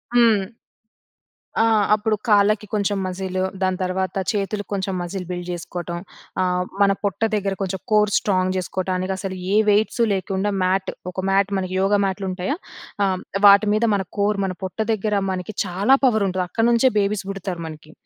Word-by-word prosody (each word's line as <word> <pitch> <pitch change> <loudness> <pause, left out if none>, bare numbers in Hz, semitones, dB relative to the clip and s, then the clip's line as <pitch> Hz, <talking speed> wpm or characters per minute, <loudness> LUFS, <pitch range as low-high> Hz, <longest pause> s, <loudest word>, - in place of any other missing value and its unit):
హ్మ్. 230 -4 +5 1.2
ఆ! - - +5 0.3
అప్పుడు 215 +1 +1
కాళ్ళకి 210 0 +3
కొంచెం 205 -1 0
మజీలు 185 0 -3 0.2
దాని 185 -1 +1
తర్వాత 185 0 -1 0.2
చేతులకి 205 -1 -3
కొంచెం 195 -1 -2
మజిల్ 180 +1 -4
బిల్డ్ 175 -1 -4
జేసుకోటం. 175 0 -5 0.4
ఆహ్, 180 0 +1 0.2
మన 200 0 +5
పొట్ట 200 -2 -1
దగ్గర 200 -2 0
కొంచెం 190 0 -2
కోర్ 210 -1 +4
స్ట్రాంగ్ 185 -2 +1
జేసుకోటానికసలు, 185 +1 -2 0.2
ఏ - - +4
వెయిట్సు 215 +3 +2
లేకుండా 195 +1 -1
మ్యాట్ 190 +1 +1 0.2
ఒక 185 +1 -4
మ్యాట్, 195 0 +3
మనకి 185 -1 -3
యోగా 200 +2 +3
మ్యాట్‍లుంటాయా! 190 +5 -2 0.5
ఆహ్, 190 -1 +1
హ్మ్. - - -10 0.2
వాటి 200 +1 +7
మీద 215 +2 +1
మన 195 -1 -1
కోర్ 205 0 +1
మన 185 -1 -3
పొట్ట 185 - -5 0.2
దగ్గర 215 0 -1 0.2
మనకి 185 +2 -5
చాలా 195 +8 +3
పవరుంటది. 200 -6 +2
అక్కడి 225 +5 +1
నుంచే 240 +2 +4
బేబీస్ 200 -1 0
బుడతారు 190 -3 -5
మనకి. 155 -1 -11
195 Hz, 155 wpm, -22 LUFS, 185-205 Hz, 1.2 s, వాటి